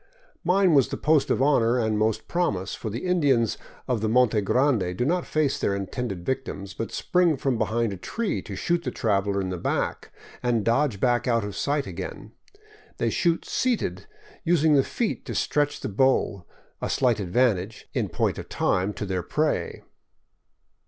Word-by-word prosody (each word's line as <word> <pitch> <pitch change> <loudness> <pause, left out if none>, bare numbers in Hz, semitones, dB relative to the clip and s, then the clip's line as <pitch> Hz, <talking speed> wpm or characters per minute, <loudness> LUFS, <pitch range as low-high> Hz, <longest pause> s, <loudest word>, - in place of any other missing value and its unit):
Mine 185 0 +3
was 135 -4 +5
the - - -4
post 155 -2 +2
of 130 - +2
honor 125 -4 +3
and 110 -3 +1
most 110 +1 0
promise, 105 - -1
for 110 - -5
the 115 - -5
Indians 140 - +2 0.3
of 125 -4 0
the 110 - 0
Monte 115 -2 +3
Grande 105 -5 +1
do 125 - +1
not 175 +4 0
face 155 -3 0
their 100 - 0
intended 100 -1 -4
victims, 100 -7 -3
but 115 - -5
spring 175 -4 +2
from 130 -3 -1
behind 115 -1 0
a - - -6
tree 205 - -2
to 100 - -7
shoot 170 - 0
the - - -2
traveler 100 -3 0
in 95 -1 -2
the 90 -2 -4
back, - - -2 0.3
and 120 -4 0
dodge 120 -2 +1
back 120 +1 +1
out 115 -2 +2
of 100 -1 -5
sight 145 0 0
again. - - -7 0.7
They - - 0
shoot 170 -2 +1
seated, 250 -3 -1 0.4
using 160 -3 +3
the 140 -2 +5
feet 230 - -2
to - - -4
stretch 145 -1 0
the - - -3
bow, 105 -4 +1 0.4
a - - -2
slight 125 -4 +2
advantage, 105 +1 0
in - - -1
point - - -1
of - - -9
time, 95 +3 0
to 105 - -5
their 95 -2 -2
prey. 150 - -1
120 Hz, 180 wpm, -25 LUFS, 105-145 Hz, 0.7 s, was